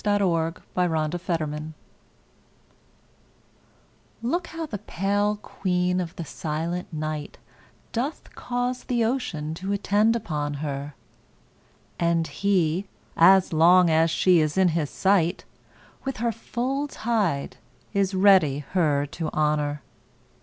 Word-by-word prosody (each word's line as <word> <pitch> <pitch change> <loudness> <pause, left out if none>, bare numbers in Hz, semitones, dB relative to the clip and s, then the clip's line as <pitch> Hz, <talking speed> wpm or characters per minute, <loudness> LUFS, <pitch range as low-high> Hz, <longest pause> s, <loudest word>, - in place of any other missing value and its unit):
Y 205 -1 +2
Z 200 - +2
A 170 +1 -1
Sonnet 155 -1 -1
of 175 0 -5
the 165 -3 0
Moon 150 +1 -6 2.5
LOOK 335 +8 -1
how 330 0 -5
the 215 -9 -6
pale 205 +1 0
queen 180 -1 0
of 170 -1 -6
the 170 - -5
silent 165 +5 -4
night 155 -1 -4 0.5
Doth 260 +7 -4
cause 245 +1 -3
the 240 -2 +1
ocean 170 - -2
to 190 +4 -4
attend 205 +3 +2
upon 150 -10 -3
her, 140 -1 -5 1.0
And 170 -1 +2
he, 180 +2 0 0.3
as 190 +1 +6
long 175 +2 +6
as 160 +1 +4
she 180 +1 +4
is 155 +2 0
in 190 -1 +5
his 160 -3 -1
sight, 190 -3 +1 0.6
With 270 -1 -3
her 235 +1 0
full 255 +5 -3
tide 210 - -1 0.4
is 195 -1 +1
ready 185 -8 +4
her 150 -6 +2
to 155 +2 -4
honor. 150 -1 0
180 Hz, 125 wpm, -25 LUFS, 155-205 Hz, 2.5 s, as